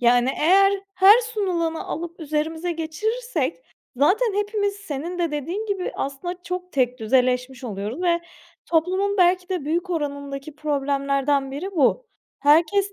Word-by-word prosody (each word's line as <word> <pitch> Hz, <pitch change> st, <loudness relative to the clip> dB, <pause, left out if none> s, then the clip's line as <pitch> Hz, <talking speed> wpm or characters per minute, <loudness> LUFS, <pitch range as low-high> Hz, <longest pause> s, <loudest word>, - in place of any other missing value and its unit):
Yani 245 Hz, +1 st, +4 dB
eğer 390 Hz, +5 st, +5 dB, 0.2 s
her 390 Hz, +5 st, +7 dB
sunulanı 370 Hz, -8 st, -2 dB
alıp 340 Hz, +2 st, -6 dB
üzerimize 320 Hz, +3 st, -2 dB
geçirirsek 335 Hz, -, -2 dB, 0.4 s
zaten 390 Hz, -, +3 dB
hepimiz 410 Hz, -1 st, 0 dB
senin 350 Hz, -2 st, -5 dB
de 340 Hz, -2 st, 0 dB
dediğin 335 Hz, +9 st, -3 dB
gibi 395 Hz, -3 st, -2 dB
aslında 350 Hz, +7 st, -4 dB
çok 360 Hz, 0 st, -5 dB
tekdüzeleşmiş 250 Hz, 0 st, +1 dB
oluyoruz 215 Hz, -, -4 dB
ve 345 Hz, -1 st, +2 dB, 0.5 s
toplumun 375 Hz, +5 st, +1 dB
belki 360 Hz, 0 st, +3 dB
de 365 Hz, -6 st, -2 dB
büyük 340 Hz, +5 st, -1 dB
oranındaki 285 Hz, -2 st, -4 dB
problemlerden 275 Hz, -1 st, 0 dB
biri 305 Hz, +9 st, -5 dB
bu. 325 Hz, -, +2 dB, 0.3 s
Herkes 335 Hz, +7 st, +3 dB
330 Hz, 125 wpm, -23 LUFS, 280-375 Hz, 0.5 s, her